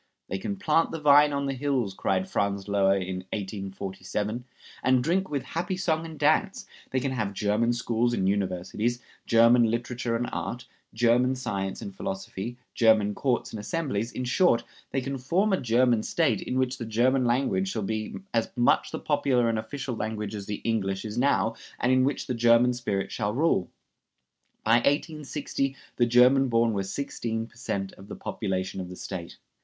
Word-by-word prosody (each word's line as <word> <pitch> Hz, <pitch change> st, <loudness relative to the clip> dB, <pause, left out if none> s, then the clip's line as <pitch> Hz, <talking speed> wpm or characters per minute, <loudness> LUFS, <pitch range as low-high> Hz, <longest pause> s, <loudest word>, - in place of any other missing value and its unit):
"They 95 Hz, -, -2 dB
can 200 Hz, -, -3 dB
plant 165 Hz, -4 st, +2 dB
the 165 Hz, -, -5 dB
vine 150 Hz, 0 st, +6 dB
on 140 Hz, 0 st, -1 dB
the 135 Hz, -, -1 dB
hills," 130 Hz, -6 st, -1 dB
cried 185 Hz, -, 0 dB
Franz 100 Hz, -, -1 dB
Löher 100 Hz, -1 st, +3 dB
in 95 Hz, 0 st, -4 dB, 0.2 s
1847, 100 Hz, +2 st, -4 dB, 0.4 s
"and 130 Hz, -1 st, +3 dB
drink 190 Hz, +5 st, +1 dB
with 140 Hz, -3 st, -2 dB
happy 170 Hz, +7 st, -3 dB
song 165 Hz, -3 st, 0 dB
and 160 Hz, -1 st, -9 dB
dance; -, -, +2 dB, 0.2 s
they 130 Hz, -, 0 dB
can 130 Hz, +1 st, -2 dB
have 105 Hz, -6 st, -2 dB
German 105 Hz, +4 st, +1 dB
schools 120 Hz, 0 st, 0 dB
and 95 Hz, -6 st, 0 dB
universities, 100 Hz, +4 st, -1 dB, 0.3 s
German 115 Hz, 0 st, +5 dB
literature 120 Hz, +1 st, -2 dB
and 120 Hz, +1 st, -1 dB
art, 125 Hz, +1 st, -4 dB, 0.3 s
German 120 Hz, +3 st, +3 dB
science 95 Hz, -6 st, -3 dB
and 100 Hz, -, -7 dB
philosophy, 95 Hz, +5 st, -5 dB, 0.2 s
German 110 Hz, -3 st, +4 dB
courts 125 Hz, +3 st, -1 dB
and 110 Hz, -, -4 dB
assemblies; 120 Hz, -3 st, -2 dB
in 125 Hz, -, -4 dB
short, 125 Hz, -1 st, +3 dB, 0.3 s
they 135 Hz, -, -1 dB
can 135 Hz, +1 st, -4 dB
form 185 Hz, +11 st, +1 dB
a 190 Hz, -, +1 dB
German 120 Hz, -1 st, +3 dB
State, -, -, +1 dB
in 125 Hz, -, -3 dB
which 130 Hz, -1 st, 0 dB
the 115 Hz, -, -4 dB
German 125 Hz, +4 st, +2 dB
language 120 Hz, -6 st, +1 dB
shall 110 Hz, +1 st, -2 dB
be 110 Hz, +2 st, -3 dB, 0.2 s
as 115 Hz, -1 st, +1 dB
much 125 Hz, +4 st, +3 dB
the -, -, -4 dB
popular 135 Hz, -5 st, +1 dB
and 110 Hz, -1 st, 0 dB
official 130 Hz, +2 st, -5 dB
language 105 Hz, -1 st, -3 dB
as 100 Hz, -2 st, -6 dB
the 105 Hz, -1 st, -4 dB
English 100 Hz, -3 st, -1 dB
is 105 Hz, 0 st, -5 dB
now, 120 Hz, -3 st, +2 dB, 0.3 s
and 125 Hz, -, +2 dB
in 130 Hz, 0 st, +4 dB
which 140 Hz, +1 st, 0 dB
the 125 Hz, -, -2 dB
German 120 Hz, +1 st, +4 dB
spirit 100 Hz, -5 st, -2 dB
shall 105 Hz, 0 st, -2 dB
rule." 145 Hz, -, +2 dB, 0.9 s
By 115 Hz, +2 st, +5 dB
1860 140 Hz, 0 st, -1 dB, 0.2 s
the 120 Hz, -, +3 dB
German 125 Hz, +3 st, +5 dB
born 115 Hz, -1 st, +2 dB
were 100 Hz, -, 0 dB
sixteen 115 Hz, +1 st, -3 dB
per 115 Hz, -, -20 dB
cent 100 Hz, -5 st, -3 dB
of 95 Hz, -, -14 dB
the -, -, -7 dB
population 95 Hz, -2 st, -3 dB
of 90 Hz, -, -7 dB
the 90 Hz, -, -8 dB
State. 85 Hz, -1 st, -7 dB
120 Hz, 180 wpm, -27 LUFS, 105-130 Hz, 0.9 s, vine